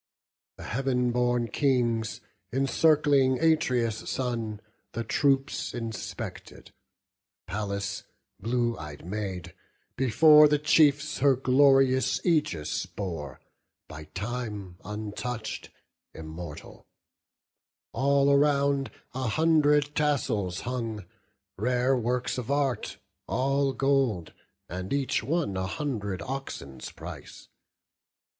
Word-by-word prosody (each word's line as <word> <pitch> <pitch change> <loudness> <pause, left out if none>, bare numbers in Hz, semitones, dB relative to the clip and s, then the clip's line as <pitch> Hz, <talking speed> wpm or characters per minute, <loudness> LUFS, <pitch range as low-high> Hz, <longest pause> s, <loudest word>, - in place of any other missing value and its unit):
The - - -9
Heav'n 125 0 0
born 120 -1 +1
Kings, 120 -6 0 0.3
encircling 135 0 +3
Atreus' 125 -9 +1
son, 115 -5 -2 0.3
The 115 - -2
troops 135 +2 0
inspected: 115 -2 -7 0.7
Pallas, 100 0 -3 0.3
blue 120 0 0
ey'd 75 0 -9
Maid, 95 -3 -5 0.4
Before 150 +4 +7
the 150 0 +3
chiefs 150 0 +3
her 140 0 +5
glorious 135 0 +4
aegis 150 - 0
bore, 80 -8 -6 0.5
By 75 0 -9
time 105 -1 -5
untouch'd, 110 +2 -5 0.5
immortal: 80 0 -9 1.1
all 140 +2 +3
around 140 -1 +3 0.2
A 130 0 -2
hundred 150 +1 +3
tassels 120 -12 0
hung, 115 -5 -4 0.5
rare 125 +4 +2
works 125 +1 -1
of 125 0 -6
art, 140 -5 0 0.3
All 135 +2 +1
gold, 135 - +1 0.6
each 140 -3 0
one 145 - -1
a 95 0 -2
hundred 105 - -3
oxen's 70 - -6
price. - - -10
125 Hz, 90 wpm, -27 LUFS, 105-140 Hz, 1.1 s, Before